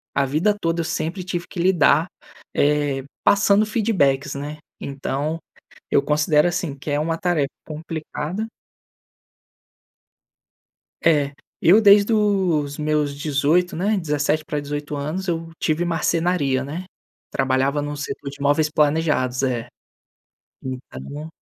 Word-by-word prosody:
a 140 - +3
vida 160 +10 +1
toda 165 -1 0
eu - - -3
sempre 170 +4 -3
tive 175 -1 -3
que 180 - -8
lidar, 170 -3 +4 0.5
eh, 145 -2 +1 0.2
passando 205 +1 +4
feedbacks, 195 - +1
né. 145 +2 -5 0.2
Então, 140 +3 -3 0.5
eu - - +5
considero 150 +1 +3
assim 170 -4 -3
que 145 +2 -5
é 145 - +1
uma 165 +2 -1
tarefa 165 -6 0 0.2
complicada. 160 +4 -4 2.6
É, 145 -4 +3 0.3
eu 190 +7 +6
desde 205 +1 +6
os 185 -9 +1
meus 150 -1 0
18, 150 +4 +1
né, 205 +5 +1
17 150 -1 0
pra 150 -1 -2
18 145 +1 -5
anos 155 +7 -3
eu 165 -1 -2
tive 160 +2 0
marcenaria, 165 -4 +1
né. 160 +7 -5 0.5
Trabalhava 135 +2 +1
num 145 0 -4
setor 145 -1 -5
de 140 0 -13
móveis 145 +2 +2
planejados. 150 -4 +1
É, 125 -3 -1 1.2
então, 150 +2 -7
155 Hz, 125 wpm, -22 LUFS, 145-175 Hz, 2.6 s, eu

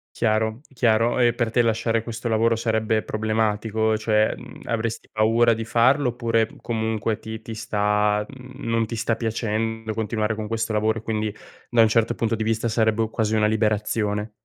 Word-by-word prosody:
Chiaro, 110 +1 0
chiaro. 115 0 +2
E 120 -1 +4
per 115 -3 -1
te 120 - +3
lasciare 115 0 +1
questo 115 +1 -5
lavoro 115 +1 +2
sarebbe 110 -1 0
problematico, 110 0 0
cioè, 110 0 +2
mhmm, - - -12
avresti 115 0 -3
paura 115 +2 +3
di 115 0 -3
farlo 125 +4 +3
oppure 115 -2 +1
comunque 110 -1 -2
ti 110 0 -7
ti 115 - -7
sta 105 -1 +1
mhmm, 130 -1 -10
non 115 0 +1
ti 115 - -5
sta 115 0 0
piacendo 110 -1 -2
continuare 110 0 -1
con 105 0 -5
questo 115 0 -2
lavoro 110 +1 +1
e, - - -12
quindi, 110 -1 -2 0.3
da 120 -1 +4
un 110 - +5
certo 115 +1 +2
punto 115 0 0
di 110 - -2
vista, 115 +1 0
sarebbe 110 0 +1
quasi 110 -1 0
una 110 -1 +3
liberazione? 105 -1 0
110 Hz, 175 wpm, -23 LUFS, 110-115 Hz, 0.3 s, un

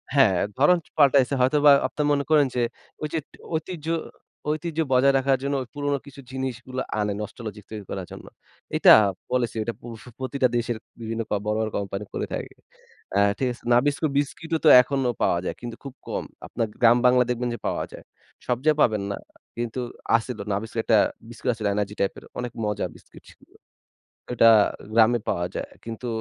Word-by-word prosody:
হ্যাঁ। 110 -10 +5 0.2
ধরন 175 +6 +5 0.2
পাল্টাইছে 140 -2 +5
হয়তোবা 145 +3 +5 0.2
আপনারা 150 -1 -2
মনে 140 0 +2
করেন 150 -2 +5
যে, 125 - +1 0.4
ঐ - - -6
যে, 160 - +1 0.4
ঐতিহ্য 160 -1 -5 0.6
ঐতিহ্য 155 +1 -2
বজায় 135 +2 +5
রাখার 135 0 +2
জন্য 140 0 0 0.2
পুরনো 145 -1 -1
কিছু 140 0 -12
জিনিসগুলো 130 -1 -4 0.2
আনে 105 -1 0
nostalgic 105 -1 -7
তৈরি 105 -3 -7
করার 95 -2 -4
জন্য। - - -10 0.5
এটা - - +7 0.4
policy 125 -2 0
ঐটা 115 - -3
push 115 -2 -9 0.2
প্রতিটা 130 0 +1
দেশের 120 -1 -1 0.2
বিভিন্ন 115 0 -3 0.2
বড়, 105 0 0
বড় 110 -1 0
কোম্পানি 100 0 -4
করে - - -2
থাকে। - - -5 0.6
অ্যা 100 - +3 0.2
ঠিক 130 - 0
আছে? 120 - -17
নাবিস্কো 145 +5 +2
বিস্কিট 155 +3 -2
ও - - -12
তো - - +8
এখনো 135 -1 -1
পাওয়া 85 - +2
যায় - - -3
কিন্তু 120 -1 -6
খুব 135 -2 -8
কম। - - -3 0.2
আপনার 115 -2 -2
গ্রাম 120 +1 +6
বাংলায় 125 0 +5
দেখবেন 120 0 -1
যে, - - -11
পাওয়া - - -1
যায়। - - -11 0.4
সব 125 -1 +1
জায়গায় 155 -1 +3
পাবেন 105 -4 +3
না। - - -3 0.4
কিন্তু 120 +1 -3 0.4
আছিলো 115 -2 -6
নাবিস্কো 110 +3 -4
একটা 110 - +4 0.3
বিস্কুট 120 +2 -4
আছিলো 110 -3 -3
এনার্জি 105 0 -2
টাইপের 100 - -2 0.2
অনেক 125 -1 -4
মজা 105 -1 -1
বিস্কুট - - -16
ছিলো। - - -21 0.8
ঐটা 115 -1 +6 0.4
গ্রামে 115 +1 +5
পাওয়া 85 0 0
যায় - - -4 0.2
কিন্তু 115 +2 -6
125 Hz, 175 wpm, -24 LUFS, 110-140 Hz, 0.8 s, তো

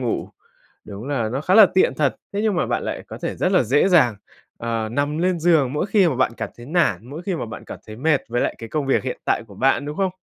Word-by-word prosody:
ngủ. - - -2 0.6
Đúng 105 +5 -8
là 120 -6 -1
nó 130 +5 -3
khá 185 +5 +1
là 215 -3 +9
tiện 185 -8 +3
thật. 140 -1 0 0.2
Thế 200 - -2
nhưng 215 -3 +1
mà - - +1
bạn - - -1
lại - - -4
có - - -8
thể - - -3
rất 185 - 0
là 180 - +4
dễ 140 - +3
dàng, 135 - +4 0.4
ờ, 115 -1 -2
nằm 145 +3 -1
lên 180 0 +1
giường 155 -6 +3
mỗi 150 +6 -1
khi 195 -4 +3
mà 130 - -2
bạn 130 - +1
cảm - - -4
thấy 120 +1 -11
nản, 125 - +1
mỗi 160 +5 -7
khi 185 -1 -2
mà 120 - -4
bạn 110 - -9
cảm - - -9
thấy 110 0 -9
mệt 145 +2 +1
với 120 +1 -1
lại - - 0
cái 115 - -8
công 145 +2 -2
việc 135 - +2
hiện 130 - -4
tại - - +1
của 100 - -14
bạn, 135 +5 +2
đúng 150 +1 -6
không? 190 -2 0
145 Hz, 280 wpm, -22 LUFS, 120-175 Hz, 0.6 s, là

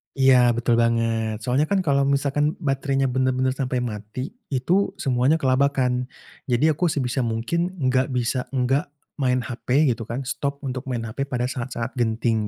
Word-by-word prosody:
Iya, 130 -3 +5
betul 120 0 +2
banget, 115 -1 0
soalnya 130 +4 +2
kan 195 +1 +1
kalau 140 -3 +2
misalkan 140 +2 +1
baterainya 135 -1 0
benar-benar 130 0 +1
sampai 130 -2 -1
mati, 110 - -5 0.2
itu 170 +9 0
semuanya 130 +3 +2
kelabakan. 130 -2 +1 0.4
Jadi 135 +5 +3
aku 175 +4 0
sebisa 135 -5 -1
mungkin 165 +11 -1
nggak 130 -4 +1
bisa 125 +1 -1
nggak 135 +3 +1 0.3
main 125 -2 +2
HP, 125 +5 +1
gitu 115 -1 -4
kan, 120 +4 -3
stop 140 +2 -3
untuk 130 -1 -4
main 120 -3 -2
HP 115 +5 -3
pada 125 -2 -2
saat-saat 125 -1 -4
genting, 110 -2 0
130 Hz, 155 wpm, -23 LUFS, 120-140 Hz, 0.4 s, Iya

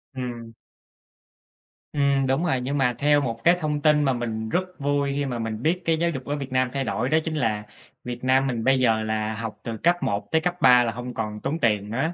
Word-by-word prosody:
Ừm. 120 -3 -6 1.4
Ừm, 140 -2 +2
đúng 135 +7 +1
rồi, 130 -7 0
nhưng 140 +3 -2
mà 125 -3 +1
theo 145 0 +4
một 115 -3 -3
cái 170 +1 +6
thông 150 -2 -2
tin 150 -1 +4
mà 135 -2 +2
mình 110 -2 -3
rất 180 - +1 0.2
vui 140 0 0
khi 145 - -1
mà 125 -3 -3
mình 115 -1 -4
biết 170 +6 +1
cái 165 -1 +2
giáo 170 0 +2
dục 135 -6 -5
ở 145 - -2
Việt 135 -2 -6
Nam 130 0 +1
thay 135 - -1
đổi 125 +1 -1
đó 160 - +3
chính 160 -1 -3
là 110 -6 0 0.4
Việt 125 0 -6
Nam 130 +1 +3
mình 120 -3 -2
bây 135 0 +3
giờ 110 -3 +2
là 110 0 -1
học 115 0 -6
từ 115 -1 -4
cấp 175 +6 +3
1 100 0 -2
tới 160 - +3
cấp 180 +1 -1
3 125 -3 +7
là 115 - -1
hông 125 +2 -6
còn 105 -1 -4
tốn 155 +5 -2
tiền 105 -3 +1
nữa, 135 +10 -1
130 Hz, 240 wpm, -24 LUFS, 115-145 Hz, 1.4 s, 3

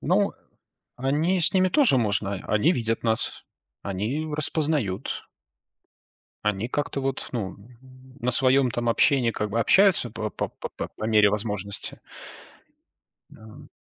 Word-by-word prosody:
Ну, - - +2 0.6
они, 150 +8 +1
с 170 - +6
ними 185 -1 +3
тоже 235 - +4
можно. 100 -3 0
Они 125 - +3
видят 115 -5 -1
нас. 110 0 -1 0.4
Они 105 +11 -3
распознают. 150 - -1 1.2
Они 105 +2 0
как-то 145 +1 -2
вот, 135 0 -3
ну, 100 -6 -3
н 115 +5 -18 0.4
на 125 - 0
своем, 130 +1 +3
там, 120 0 -2
общении, 125 +1 +3
как 105 -1 -3
бы, 115 +3 0
общаются, 190 - +4
по 110 -1 -4
по - - -3
по - - -7
по - - -8
мере 105 -2 +5
возможности. 105 -1 -3 1.3
Да. 110 0 -14
120 Hz, 130 wpm, -25 LUFS, 105-140 Hz, 1.3 s, с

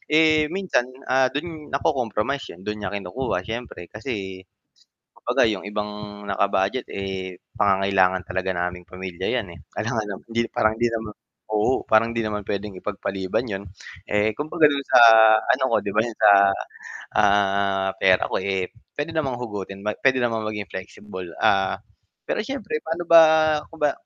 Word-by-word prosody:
Eh, 155 -1 +4
minsan, 180 -9 0 0.2
ah, 130 0 +3
do'n 150 +2 -6
nako-compromise 135 -1 -1
'yon 90 +2 -12
do'n 105 0 -4
niya 100 -1 -4
kinukuha 100 +7 -3
siyempre 115 -6 -7
kasi 95 -3 -5 0.8
kumbaga 110 - +2
'yung 100 -1 -4
ibang 105 0 -6
naka-budget, 100 +5 0
eh, 95 -2 -5 0.2
pangangailangan 95 -2 +2
talaga 95 +1 -2
naming 90 0 -3
pamilya 95 0 -6
'yan, 120 -5 -1
eh. - - -13 0.2
Kailangan 110 -1 -2
ng - - -12
hindi 115 - 0
parang 110 0 +1
hindi 120 - +2
naman 110 -1 -4 0.4
oo, 110 +5 +1
parang 115 +1 +4
hindi 115 -1 -1
naman 105 -1 -3
puwedeng 100 0 -4
ipagpaliban 95 +2 -3
'yon, 100 -3 -5 0.5
eh, 105 +1 +1
kumbaga 155 +3 +2
do'n 140 -1 +1
sa - - +6 0.5
ano 130 - -4
ko - - +3
'di 100 - -4
ba, 110 - +4
'yon 115 -1 -5
sa, - - +6 0.9
ah, 100 -1 +2
pera 95 -1 +4
ko, - - +1
eh, 95 -1 -2 0.3
puwede 145 +3 -3
namang 135 -5 0
hugutin 100 -4 -6
ma 105 - 0
puwede 130 -1 +3
namang 115 -2 -1
maging 105 -2 -4
flexible. 95 0 -8 0.2
Ah, 95 -1 +3 0.5
pero - - -1
siyempre 215 - -4
pa'no 165 +2 -3
ba 165 0 +10 0.5
kung 165 - -13
ba 145 - +4
105 Hz, 160 wpm, -23 LUFS, 95-130 Hz, 0.9 s, ba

